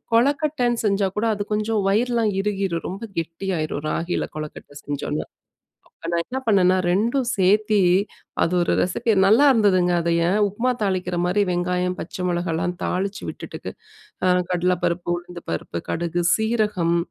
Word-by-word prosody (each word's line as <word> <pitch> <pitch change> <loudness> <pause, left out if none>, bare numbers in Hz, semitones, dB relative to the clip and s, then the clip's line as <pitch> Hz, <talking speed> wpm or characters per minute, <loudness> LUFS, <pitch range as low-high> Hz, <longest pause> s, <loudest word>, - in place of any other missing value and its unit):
கொழக்கட்டன்னு 255 -1 +1
செஞ்சா 200 -1 +2
கூட, 225 +2 +1
அது 205 - -3
கொஞ்சம் 215 0 0
வயிறெல்லாம் 230 +1 +2
இறுகீரும். 195 -4 -2
ரொம்ப 195 +5 -7 0.2
கெட்டியாயிரும், 165 -3 -3
ராகில 170 +1 -2
கொழக்கட்ட 155 -1 -8
செஞ்சோன்னா. 145 +1 -3 0.8
அ - - -3
நான் 170 - +2
என்ன 260 - -4
பண்ணேன்னா, 185 -3 +4
2ம் 235 +8 +1
சேத்து 210 +2 +3 0.6
அது 165 - 0
ஒரு 170 - +1
ரெசிபி, 220 +6 0
நல்லா 220 +9 +6
இருந்ததுங்க, 190 -7 +3
அதுவே! 170 +3 +2
உப்புமா 230 +6 0
தாளிக்கிற 185 -3 -1
மாரி 185 +4 +2
வெங்காயம், 180 +1 0
பச்ச 180 +2 -5
மொளகாலாம் 175 -1 -1
தாளிச்சு 195 +2 -2
விட்டுட்டு - - -7 0.6
அ - - +4 0.2
கடலப்பருப்பு, 180 -1 0
உளுந்துபருப்பு, 170 - -6
கடுகு, 170 +1 -1
சீரகம் 210 -6 +1
185 Hz, 130 wpm, -23 LUFS, 175-215 Hz, 0.8 s, நல்லா